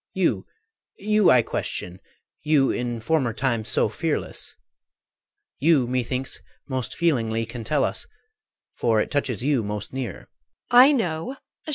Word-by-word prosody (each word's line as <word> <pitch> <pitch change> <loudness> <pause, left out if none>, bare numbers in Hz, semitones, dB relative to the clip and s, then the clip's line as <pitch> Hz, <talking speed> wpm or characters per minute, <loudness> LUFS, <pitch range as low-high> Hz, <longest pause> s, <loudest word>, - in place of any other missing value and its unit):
You, - - +1 0.5
you 210 -1 +3
I 125 -2 +6
question, 90 -3 -3 0.4
you 150 -3 +3
in 120 -2 -3
former 130 -3 +1
time 120 -2 0
So - - +1
fearless! - - -3 1.0
You 145 -3 +4
methinks 125 +1 -2 0.3
most 130 -3 -3
feelingly 115 -9 +1
Can 115 +1 -7
tell 140 +5 +1
us, - - -2 0.7
for 115 -2 +1
it - - -1
touches 130 -5 -1
you 140 -3 +2
most 105 +2 -5
near. 130 -7 -5
125 Hz, 115 wpm, -24 LUFS, 115-145 Hz, 1.0 s, I